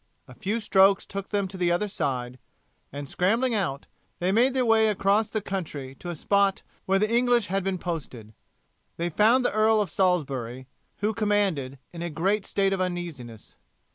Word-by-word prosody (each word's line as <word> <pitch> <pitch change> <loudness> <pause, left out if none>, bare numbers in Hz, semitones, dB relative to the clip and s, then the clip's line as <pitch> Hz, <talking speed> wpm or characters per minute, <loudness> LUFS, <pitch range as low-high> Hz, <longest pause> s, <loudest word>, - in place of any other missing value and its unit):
A 130 - -12
few 205 - -2
strokes 195 -2 +4
took 195 0 -6
them 200 -2 0
to 190 +1 -9
the 175 -1 +1
other 175 +5 +1
side, 125 -8 -3 0.5
and 140 0 -6
scrambling 225 - +1
out, 170 -10 -2 0.3
they 180 +2 0
made 250 +6 +3
their 255 -1 +2
way 220 -1 +4
across 205 +1 +2
the 215 - -2
country 150 -10 -5
to - - -9
the 175 - -3
spot 200 +4 +1 0.2
where 195 0 +3
the 210 +2 +2
English 245 -2 +3
had 195 0 0
been 190 -1 -1
posted. 135 -11 -6 0.6
They 170 +1 -2
found 230 +8 +4
the - - +1
Earl 215 +1 +3
of 200 -6 -1
Salisbury, 135 -9 -1 0.3
who 210 +2 +1
commanded, 200 - 0 0.2
in 170 - -7
a 170 - -3
great 195 +6 0
state 195 -1 +1
of 190 - -1
uneasiness. 165 - -6
190 Hz, 180 wpm, -26 LUFS, 160-210 Hz, 0.6 s, strokes